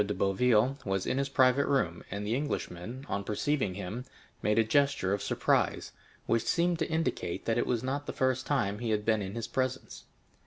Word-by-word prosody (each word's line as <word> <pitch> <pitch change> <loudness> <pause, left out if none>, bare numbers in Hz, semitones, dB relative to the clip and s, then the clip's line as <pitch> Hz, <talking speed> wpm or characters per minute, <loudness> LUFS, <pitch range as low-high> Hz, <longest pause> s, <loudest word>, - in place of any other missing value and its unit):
de 105 0 -3
Boville 120 +6 +2
was 95 -1 -1
in 130 - 0
his 140 0 -1
private 130 0 +4
room, 90 -12 0
and 100 +1 -4
the 110 - 0
Englishman, 125 -3 -3
on 100 0 -2
perceiving 105 -1 -1
him, 105 +5 -5 0.4
made 105 +1 +1
a 115 - +6
gesture 140 -4 +2
of 100 - -1
surprise, 100 - +1 0.3
which 115 - +2
seemed 175 -1 +1
to 160 - -1
indicate 160 - -2
that 115 +1 +1
it - - 0
was 120 -1 0
not 140 +2 -2
the - - -2
first 130 0 0
time 105 -8 0
he 120 -1 -2
had 105 -1 0
been 110 -2 +2
in 95 +1 -5
his 115 -1 -3
presence. 130 0 -3
115 Hz, 200 wpm, -30 LUFS, 100-135 Hz, 0.4 s, a